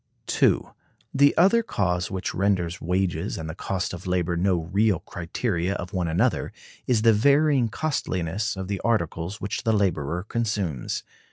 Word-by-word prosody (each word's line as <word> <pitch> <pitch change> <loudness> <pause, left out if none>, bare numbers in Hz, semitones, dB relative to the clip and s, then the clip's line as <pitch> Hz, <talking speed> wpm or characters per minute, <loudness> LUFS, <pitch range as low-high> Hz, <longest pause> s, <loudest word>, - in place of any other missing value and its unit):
The 140 +1 +4
other 195 +7 +5
cause 90 - -1
which 95 -1 -3
renders 95 -2 0
wages 90 -2 -1
and 80 - -5
the 80 - -5
cost 95 +1 -3
of 90 +1 -7
labor 90 -1 0
no 90 +2 +2
real 100 +5 +1
criteria 90 +1 -2
of 90 - -6
one 90 -3 0
another 100 +9 +1 0.4
is 115 -4 +2
the 115 -1 +6
varying 140 +2 +3
costliness 105 - -2
of 95 -1 -4
the 100 -1 -3
articles 95 -3 -1
which 100 0 -3
the 115 -2 +2
laborer 90 -5 0
consumes. 105 - -2
95 Hz, 150 wpm, -25 LUFS, 85-110 Hz, 0.4 s, the